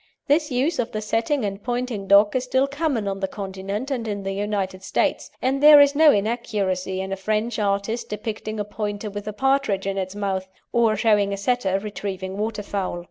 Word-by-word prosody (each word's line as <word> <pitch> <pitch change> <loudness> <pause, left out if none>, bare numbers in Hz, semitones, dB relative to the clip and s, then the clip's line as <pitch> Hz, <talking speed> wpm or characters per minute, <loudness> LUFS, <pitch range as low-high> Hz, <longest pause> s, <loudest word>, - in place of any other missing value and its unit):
This 300 +2 +2
use 275 +6 0
of 240 - -2
the 215 - -1
setting 225 +4 0
and 200 0 -4
pointing 245 -4 -3
dog 205 +3 +5
is 255 - +1
still 260 +1 +2
common 280 -6 -1
on 195 0 -2
the 190 - -1
Continent 195 +6 -5
and 240 -4 -2
in 200 -2 -3
the 195 - -2
United 195 -2 -2
States, - - -1
and 265 +2 +1
there 300 0 +10
is 285 0 +6
no 305 +1 +6
inaccuracy 200 -4 -1
in 190 0 -5
a - - 0
French 215 +4 -1
artist 200 +3 -1
depicting 215 0 -4
a 205 - -1
Pointer 205 0 -4
with 205 +1 -7
a - - -1
partridge 270 -5 +1
in 195 0 -1
its 185 +1 -4
mouth, 190 -2 -2 0.2
or 230 -2 +3
showing 210 -3 +2
a - - -3
Setter 200 -2 0
retrieving 195 -2 -5
waterfowl. 205 -4 -3
210 Hz, 195 wpm, -23 LUFS, 195-245 Hz, 0.2 s, there